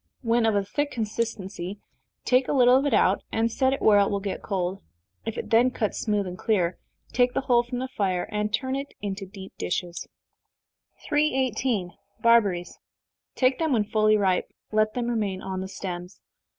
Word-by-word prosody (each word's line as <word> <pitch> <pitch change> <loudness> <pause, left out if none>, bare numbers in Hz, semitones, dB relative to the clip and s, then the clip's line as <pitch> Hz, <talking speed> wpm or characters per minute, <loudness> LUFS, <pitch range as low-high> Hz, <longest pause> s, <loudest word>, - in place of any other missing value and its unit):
When 230 -1 +2
of 220 - +2
a 200 -1 +1
thick 290 +8 -1
consistency, 205 -5 -4 0.5
take 255 0 +3
a - - 0
little 250 -2 +6
of 275 +2 +3
it 275 - 0
out, 190 0 +3
and 230 +1 +1
set 260 +3 +2
it 275 - -2
where 210 -2 +6
it 200 - +3
will 200 - -1
get 195 -1 -4
cold. 190 -1 -2 0.5
If 225 - -3
it - - -5
then 235 +3 +5
cuts 220 -4 -2
smooth 210 -2 0
and 180 0 -7
clear, 185 -6 +1 0.3
take 245 0 +2
the - - +1
whole 245 -2 +4
from 240 +1 -6
the 260 +1 -2
fire, 190 -7 -1
and 210 0 -1
turn 260 +4 -1
it 275 +1 -5
into 195 -1 -4
deep 190 0 -11
dishes. 175 -1 -3 1.0
318. 260 - +1 0.3
Barberries. 205 -7 +3 0.6
Take 255 0 +2
them 320 -2 +1
when 220 -4 +3
fully 215 0 +3
ripe, 190 -3 +1 0.2
let 215 0 +2
them 245 -1 -1
remain 210 -5 -1
on 190 -1 -3
the 190 - -4
stems. 180 -1 -6
215 Hz, 185 wpm, -26 LUFS, 195-245 Hz, 1.0 s, little